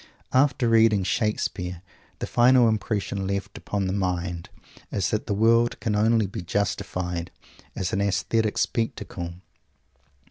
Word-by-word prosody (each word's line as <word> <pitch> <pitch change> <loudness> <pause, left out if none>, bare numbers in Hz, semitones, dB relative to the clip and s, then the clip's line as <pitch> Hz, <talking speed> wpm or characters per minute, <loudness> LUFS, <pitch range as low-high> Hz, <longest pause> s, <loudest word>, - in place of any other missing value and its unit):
After 130 -2 +3
reading 110 -3 +4
Shakespeare, 90 -4 -2 0.3
the - - -3
final 125 0 +5
impression 105 -2 -1
left 100 0 -3
upon 100 -2 -3
the 95 - -1
mind 90 -3 -2 0.4
is 95 -3 0
that 110 - -1
the 105 - 0
world 115 +2 +3
can 105 -2 -1
only 110 +1 +3
be 95 - -5
justified 90 -2 -2 0.5
as 90 - -2
an 95 - +1
aesthetic 105 +2 0
spectacle. 95 -6 -2
100 Hz, 130 wpm, -25 LUFS, 90-115 Hz, 0.5 s, final